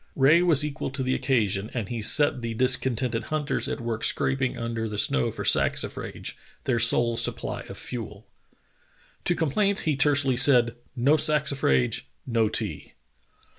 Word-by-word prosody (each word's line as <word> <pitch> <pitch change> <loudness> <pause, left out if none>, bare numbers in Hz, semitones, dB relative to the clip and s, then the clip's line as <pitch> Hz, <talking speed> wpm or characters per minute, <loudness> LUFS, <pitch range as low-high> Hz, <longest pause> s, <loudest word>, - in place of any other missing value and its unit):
Rae 150 +5 +4
was 160 -5 +4
equal 150 -1 -5
to 135 -1 -3
the 130 0 -1
occasion, 110 -7 -1
and 115 -5 -3
he 115 0 -5
set 145 +3 +4
the 115 -1 -5
discontented 125 -2 0
hunters 150 -3 -2
at - - -4
work 115 -2 -4
scraping 135 -2 -1
under 115 -1 -4
the 105 - -6
snow 65 -10 +1
for - - -6
saxifrage, - - -1 0.3
their 125 -3 0
sole 120 0 +4
supply - - -3
of - - -8
fuel. 110 -4 -6 1.0
To 175 - +2
complaints 195 +6 0
he 155 -3 0
tersely 140 -2 +2
said: 120 -3 +4 0.2
"No 140 +6 +2
saxifrage, 140 - +2 0.2
no 115 -3 0
tea." - - -3
125 Hz, 150 wpm, -25 LUFS, 115-145 Hz, 1.0 s, Rae